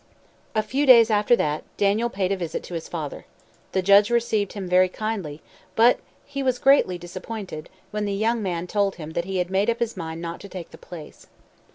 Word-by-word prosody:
A 215 - +2
few 270 +7 -1
days 235 -3 +8
after 210 +3 +4
that, 150 -7 -1
Daniel 210 +4 +2
paid 195 -4 -1
a - - +2
visit 170 -4 -4
to - - -9
his 165 -1 -4
father. 155 -4 -6 0.4
The 190 - 0
judge 200 +2 +6
received 225 -4 0
him 195 -3 -5
very 185 +1 +4
kindly, 190 -8 -4 0.3
but 235 +2 +5 0.3
he 280 -1 -5
was 255 -2 +1
greatly 265 -10 +4
disappointed 180 -1 -7 0.2
when 210 0 -2
the 200 - -2
young 225 +3 0
man 180 -3 -2
told 200 +1 0
him 155 -2 -8
that 170 +1 -2
he 190 0 -3
had 180 0 -1
made 195 +4 +2
up 235 - +1
his 235 -1 -2
mind 165 -2 -6
not 170 0 -5
to 200 - -11
take 180 -2 -8
the - - -12
place. 170 -4 -11
200 Hz, 210 wpm, -24 LUFS, 175-225 Hz, 0.4 s, days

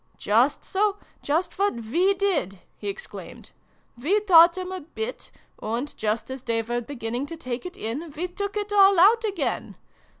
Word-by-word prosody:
" - - -37
Just 240 +8 +2
so, 405 +1 0 0.2
just 325 +6 -1
what 400 -6 +2
we 335 - +1
did! 350 - 0
" - - -42
he - - -6
exclaimed. 400 +5 -8 0.2
" 240 - -23
We 380 +10 +3
taught 340 -3 +7
'em 370 0 -4
a 375 - -4
bit, 445 +10 -6 0.3
and, 235 +7 -3
just 220 +4 -2
as 260 -1 -6
they 230 -2 -1
were 240 +2 -2
beginning 240 +1 -4
to 330 - -7
take 255 +1 -5
it 360 - -11
in, 270 +10 -4
we 355 +3 -1
took 400 +3 -4
it 415 0 -3
all 395 -2 +6
out 445 +6 +6
again 410 -3 -2
335 Hz, 190 wpm, -25 LUFS, 240-395 Hz, 0.3 s, taught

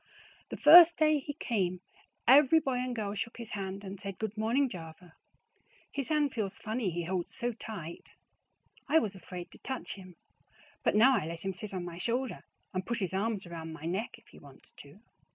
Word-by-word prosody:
The - - -5
first 340 +2 +9
day 310 -1 +4
he 290 +1 -6
come 185 - -1 0.5
every 285 +4 +7
boy 265 -5 -1
and 250 -1 -2
girl 205 -3 -3
shook 230 +2 -4
his 235 -2 -7
hand 195 -1 -5
and 195 0 -7
said 195 -2 -6
good 220 -1 -4
morning 235 +6 +2
java 170 -4 -10 0.8
his 275 -2 -3
hand 300 -3 +2
feels 210 -5 -3
funny 220 -1 -2
he 175 0 -3
holds 180 0 -2
so 245 -1 -1
tite. 200 -7 -8 0.8
I 315 - +5
was 215 -11 +1
afraid 180 -2 -8
to - - -13
touch 265 -2 -5
him 185 -2 -12 0.7
but - - +1
now 255 +5 +6
I 155 - -1
let 165 +2 -6
him 195 - -1
sit 205 +3 -5
on 185 -2 -4
my 175 0 -7
shoulder 245 +4 -2 0.3
and 185 0 -2
put 235 +5 -2
his 190 -4 -2
arms 205 0 -1
around 165 -2 -7
my 160 - -11
kneck 190 +7 -3
if - - -23
he - - -15
wants - - -15
to. - - -13
210 Hz, 200 wpm, -31 LUFS, 185-250 Hz, 0.8 s, first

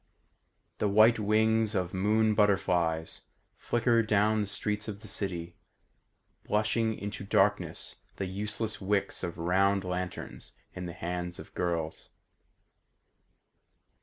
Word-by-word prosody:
The 105 - +2
white 110 +3 +6
wings 110 +1 +2
of 90 -2 -1
moon 110 +3 +2
butterflies 90 -6 +1 0.3
Flicker 120 -1 +2
down 110 0 +2
the 105 - -2
streets 105 +1 -2
of 105 -1 -6
the 110 - -11
city, 85 -4 -3 0.9
Blushing 110 +1 +1
into 100 0 -5
darkness 100 -5 +1 0.2
the 100 - -3
useless 105 +3 -4
wicks 100 +1 0
of 85 - -4
round 95 +3 +2
lanterns 90 0 -5 0.2
in 90 -1 -5
the 85 - -6
hands 90 +1 -4
of - - -11
girls. 85 -3 -2
100 Hz, 115 wpm, -30 LUFS, 90-110 Hz, 0.9 s, white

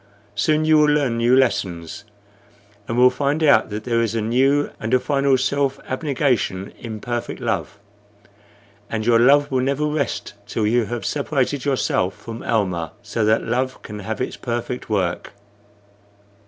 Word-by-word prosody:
Soon 155 +9 +1
you 155 -1 +5
will 150 0 +4
learn 140 -6 +1
new 120 +2 +4
lessons, 90 -10 0 0.8
and 115 - -2
will 125 +1 +6
find 140 +4 -1
out 145 - +5
that 105 +1 -5
there 115 0 +1
is 115 -1 -1
a - - +1
new 135 +6 +2
and 110 +3 +1
a - - +4
final 140 -1 +2
self 135 +1 0
abnegation 130 - -1
in 110 -2 -6
perfect 120 +1 -4
love; 100 - -2 1.1
and 110 -1 -3
your 115 -1 +4
love 145 +4 +4
will 130 -1 +1
never 140 +3 0
rest 150 -7 -2
till 110 - -1
you 115 +2 +2
have 120 +2 -5
separated 140 -2 -1
yourself 110 -8 0
from 115 0 -8
Almah, 90 -8 -1
so 115 - -2
that 110 +1 +3
love 130 +1 -1
can 105 -1 -8
have 110 +1 -5
its 125 - -3
perfect 120 0 -4
work." 95 -4 -1
125 Hz, 160 wpm, -21 LUFS, 110-140 Hz, 1.1 s, will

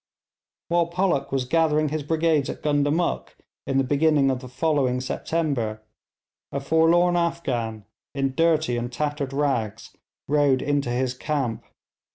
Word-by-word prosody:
While 170 -1 +2
Pollock 175 -4 0
was 135 -2 0
gathering 155 +1 +2
his 155 +1 -2
brigades 155 -1 +1
at - - -6
Gundamuk 145 +3 0 0.3
in 135 - 0
the 135 - +3
beginning 145 0 +3
of 130 - -2
the 130 -1 -10
following 130 -1 +1
September, 130 -5 -2 0.7
a 140 - -2
forlorn 165 +4 +3
Afghan, 130 -11 -2 0.3
in 135 -1 0
dirty 160 -4 +2
and 120 +1 -3
tattered 145 +1 -2
rags, 135 -7 -2 0.3
rode 145 -2 +3
into 145 -3 0
his 125 +1 0
camp. 130 -3 -2
145 Hz, 135 wpm, -24 LUFS, 130-160 Hz, 0.7 s, the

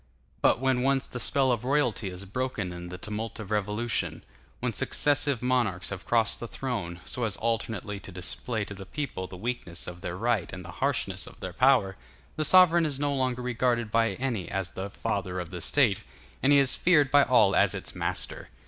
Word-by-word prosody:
But - - +4
when 130 -1 +1
once 135 0 +2
the 125 - -6
spell 130 +2 +2
of 120 -2 -1
royalty 125 -7 +1
is 90 +2 -8
broken 105 -4 -3
in 90 0 -8
the 90 - -7
tumult 110 +2 -5
of 105 -1 -7
revolution; 105 +3 -1 0.4
when - - -2
successive 145 -4 +2
monarchs 120 -9 +1
have 95 -2 -7
crossed 115 -3 +2
the 120 - -5
throne, 100 -10 -4
so 125 - -2
as 105 -5 0
alternately 110 -3 -2
to 95 - -11
display 100 +4 -3
to 100 - -8
the 95 -1 -10
people 135 -10 -4
the 90 - -10
weakness 100 -5 -4
of 90 0 -7
their 90 - -4
right 115 -4 0
and 90 -2 -8
the 85 - -8
harshness 115 -9 0
of - - -13
their 95 -1 -6
power, 125 -4 +3 0.4
the 155 - 0
sovereign 170 -1 +6
is 140 -2 -3
no 145 0 0
longer 130 -2 -1
regarded 120 -2 0
by 115 0 +2
any 120 -8 -3
as 95 -2 -2
the 95 +1 -5
Father 95 -2 -3
of 90 -1 -6
the 90 -2 -6
State, 120 - +3 0.4
and 135 - +3
he 145 - +7
is 135 -2 +4
feared 150 -6 +3
by 145 - +7
all 120 -7 +4
as 100 0 +4
its 95 - -4
master. - - -4
115 Hz, 200 wpm, -28 LUFS, 95-130 Hz, 0.4 s, he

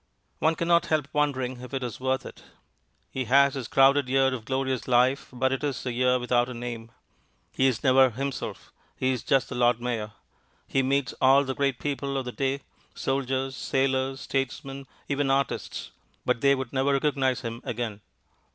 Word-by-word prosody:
One 160 +1 +2
cannot 170 +1 +2
help 150 -3 0
wondering 130 -4 0
if 125 +2 -7
it 130 - -2
is 120 -4 -5
worth 130 0 -1
it. - - -10 0.7
He 130 -1 -3
has 140 +3 +5
his 130 -5 -4
crowded 135 +1 +4
year 135 0 +3
of 115 -4 -6
glorious 130 0 -1
life, 125 +2 +3
but 130 +1 0
it 135 - -2
is 140 -4 -2
a 125 - -1
year 125 +1 +2
without 120 0 +1
a 125 - -6
name. 115 -1 -6 0.6
He 135 - +2
is 115 -4 -1
never 130 0 +6
himself, 135 +2 -5 0.2
he 130 0 0
is 125 -3 -2
just 135 -2 +1
the - - -5
Lord 120 -1 +3
Mayor. 115 -3 -3 0.5
He 135 - +1
meets 135 -1 0
all 135 +2 +6
the 135 -1 -3
great 135 -2 0
people 140 0 -3
of 135 - -2
the 125 - -4
day, 135 +2 -1 0.3
soldiers, 135 0 -1
sailors, 135 0 0
statesmen, 135 0 -3 0.2
even 140 -1 0
artists, 135 -1 -1 0.3
but 125 -2 +1
they 140 0 +5
would 130 -2 -5
never 135 +1 +2
recognize 135 -2 +1
him 115 0 -5
again. 110 -3 -4
130 Hz, 180 wpm, -26 LUFS, 125-135 Hz, 0.7 s, never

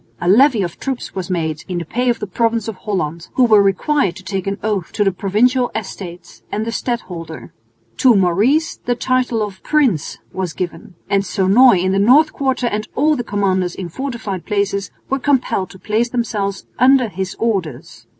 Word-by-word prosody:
A 175 - -3
levy 230 +2 +5
of 170 -2 -5
troops 265 -3 -4
was 185 -2 -5
made 160 -4 -2
(in 180 -2 -3
the 170 - -3
pay 245 +9 -1
of 235 - +1
the 210 - -4
province 230 +2 0
of 225 - -4
Holland), 175 -5 -3
who 260 - +4
were 215 -4 +6
required 195 - +1
to 190 - -11
take 190 0 -4
an 195 0 -1
oath 205 -5 -1
to 210 - +1
the 195 - +2
Provincial 240 +7 +1
Estates 185 -4 -7
and 215 +1 -2
the 230 - -3
stadholder. 180 -10 -5 0.4
To 255 -4 +5
Maurice 205 - +2
the 245 - -2
title 250 -2 0
of 200 -2 -7
"Prince" 260 - +1 0.2
was 185 -3 -3
given; 175 0 -6
and 200 -1 +1
Sonoy 195 +2 +4
in 185 - +1
the 195 - +1
North 275 +9 +5
Quarter 265 -2 -1
and 215 -2 -2
all 305 +2 +3
the 245 - -3
commanders 190 -4 0
of 175 -3 -7
fortified 235 -9 -5
places 200 -3 -1 0.2
were 270 - -1
compelled 260 -9 0
to 190 - -13
place 220 +5 0
themselves 210 -5 -2
under 255 -1 +5
his 190 -2 -5
orders. 190 - -3
205 Hz, 190 wpm, -18 LUFS, 185-245 Hz, 0.4 s, were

